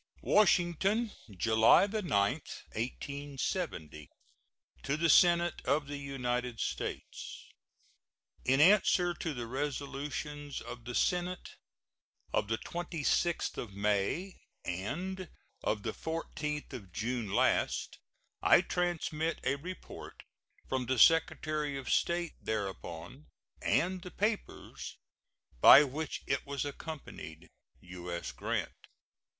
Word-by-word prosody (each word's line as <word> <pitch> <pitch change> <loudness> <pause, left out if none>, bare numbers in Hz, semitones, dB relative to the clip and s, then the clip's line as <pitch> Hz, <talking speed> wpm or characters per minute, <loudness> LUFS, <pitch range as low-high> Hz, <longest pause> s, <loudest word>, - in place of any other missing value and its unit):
WASHINGTON, 200 +3 +3 0.3
July 110 - +6
9, 210 +1 -2
1870. 135 - -2 0.7
To 140 - -1
the 165 +1 +2
Senate 175 0 +5
of 145 +3 +1
the 145 0 -5
United 125 -4 -2
States: - - -4 1.0
In 135 +1 +3
answer 180 0 +5
to 165 -2 -3
the 120 -1 -4
resolutions 145 +2 -4
of 120 -1 -9
the 125 - -5
Senate 180 0 0 0.8
of - - +1
the 110 +1 0
26th 170 +1 -1
of 100 -5 -6
May 105 - 0 0.3
and 170 - -3 0.3
of 105 -1 0
the - - -2
14th 150 -2 -4
of 100 -7 -8
June 115 +1 -2
last, - - +1 0.4
I - - +7
transmit 165 -2 -1
a 130 - +2
report 180 +6 -9 0.4
from 130 -2 -1
the 130 +1 +1
Secretary 155 0 +3
of 135 - -6
State 170 -1 +1
thereupon, 100 - -5 0.3
and 185 +1 +1
the 180 - -8
papers 210 +3 -3 0.6
by 140 - +10
which 145 +2 -4
it 135 -1 0
was 140 0 -2
accompanied. 140 - -8 0.3
U.S. 90 -1 -6
GRANT. - - -2
145 Hz, 105 wpm, -32 LUFS, 120-170 Hz, 1.0 s, by